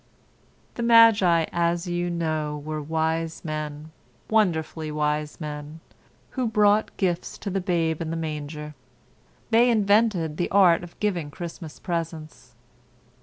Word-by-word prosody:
The - - -5
magi, 225 -8 +6
as 170 +1 0
you 175 0 -2
know, 155 -3 -2
were 155 0 -3
wise 160 +2 -2
men—wonderfully 155 - -2
wise 150 0 -2
men—who 155 - -7
brought 210 -1 +2
gifts 180 -3 -1
to 200 - -5
the 195 +1 -1
Babe 170 -3 0
in 160 - -3
the 165 - -3
manger. 150 -1 -5 0.8
They 235 +2 +5
invented 205 -7 +2
the 175 - -1
art 180 -4 +5
of 175 - -12
giving 180 -8 -1
Christmas 165 0 -8
presents. 160 -7 -5
165 Hz, 120 wpm, -25 LUFS, 155-190 Hz, 0.8 s, magi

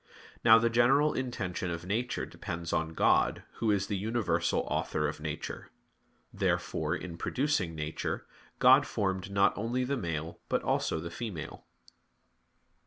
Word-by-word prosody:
Now 110 0 +9
the 115 +1 +3
general 135 +6 +4
intention 100 -9 -3
of 85 0 -4
nature 115 +6 -1
depends 85 -4 -5
on 80 0 -1
God, - - +3
Who 115 - 0
is 100 -2 +2
the 100 - -2
universal 110 +2 0
Author 75 0 -1
of 75 +1 -5
nature. 75 -1 -5 0.6
Therefore, - - 0
in 85 -2 -7
producing 130 - 0
nature, 75 0 -3 0.3
God - - +6
formed 95 -1 -1
not 100 0 +3
only 120 +4 -1
the 140 +2 -1
male 80 -4 -4
but - - +1
also 80 - 0
the 85 +1 -6
female. 85 -8 -6
95 Hz, 140 wpm, -30 LUFS, 85-115 Hz, 0.6 s, Now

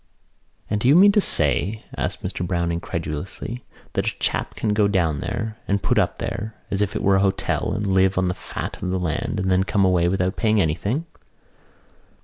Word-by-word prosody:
"And 105 - -1
do 120 - +2
you 140 - +6
mean 200 +3 +8
to 210 - +4
say," 95 - 0
asked - - -3
Mr - - -3
Browne 85 -1 0
incredulously, 85 +7 -4 0.3
"that - - -1
a - - -2
chap - - -1
can 110 - -1
go 105 -1 +3
down 85 -7 +1
there 110 +3 -3
and 100 0 0
put - - +2
up - - 0
there 110 +1 -4 0.2
as 100 - 0
if 105 - 0
it - - -2
were 100 -1 +4
a - - +2
hotel 95 -1 0
and 105 - -2
live 95 -1 +3
on 95 0 +2
the 90 - 0
fat - - -6
of 90 - -2
the 95 - 0
land 90 +3 -2
and 95 0 0
then 95 0 +4
come 100 0 +2
away 90 -2 +3
without 95 +1 0
paying 110 -1 +2
anything?" 100 - 0
95 Hz, 205 wpm, -23 LUFS, 90-105 Hz, 0.3 s, mean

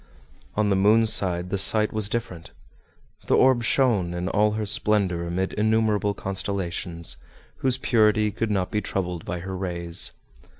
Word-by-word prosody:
On 105 -1 +1
the - - +3
moon's 110 +3 +4
side 90 -1 +2
the 100 - 0
sight 110 +2 +3
was 110 -2 -1
different; 105 -7 -5 0.7
the - - +3
orb 130 -2 +4
shone 110 -8 +1
in 90 +2 -3
all 105 +1 +1
her 110 0 -3
splendor 100 -4 0
amid 95 +2 -2
innumerable 105 -1 +1
constellations, 90 -3 -4 0.4
whose 130 -1 0
purity 110 -4 +2
could 110 +2 -3
not 95 -3 -1
be 105 - -1
troubled 90 -3 -4
by 85 0 -5
her 95 +1 -6
rays. 85 -2 +1
100 Hz, 155 wpm, -24 LUFS, 90-110 Hz, 0.7 s, moon's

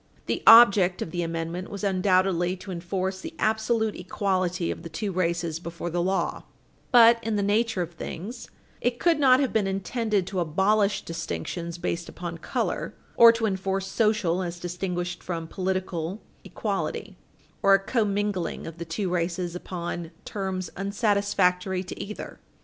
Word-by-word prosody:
The - - -2
object 200 -6 +8
of 160 - -8
the 175 - -2
amendment 165 +2 -3
was 200 0 -7
undoubtedly 185 -2 +2
to 190 +1 -9
enforce 185 +2 -3
the 325 0 -8
absolute 220 0 +1
equality 180 -1 -1
of - - -6
the 170 - -8
two 195 +6 -3
races 170 -3 -1
before 170 0 -6
the 175 +1 0
law, 190 +2 0 0.5
but, 235 -2 +7
in 225 -1 -1
the 205 - +1
nature 210 -1 +1
of 170 - -8
things, 190 +7 -7 0.3
it 245 -1 0
could 335 0 +2
not 260 -2 +6
have 275 -3 0
been 210 -3 +2
intended 200 +1 -1
to 190 0 -3
abolish 195 +5 +2
distinctions 170 - -5
based 170 0 -3
upon 170 -1 -6
color, - - -2 0.2
or 235 0 +9
to 230 -1 -1
enforce 195 -1 -1
social, 195 -4 +1
as 175 -1 -4
distinguished 175 0 -3
from 165 -2 -4
political, 185 0 -3 0.2
equality, - - -3 0.5
or 195 0 +6
a - - +2
commingling 205 -3 -1
of 165 0 -8
the 170 - -4
two 185 +5 -2
races 175 0 -2
upon 175 -2 -5 0.2
terms 190 -3 -4
unsatisfactory 195 -3 +1
to 185 - -7
either. 210 +1 -8
185 Hz, 155 wpm, -26 LUFS, 175-205 Hz, 0.5 s, or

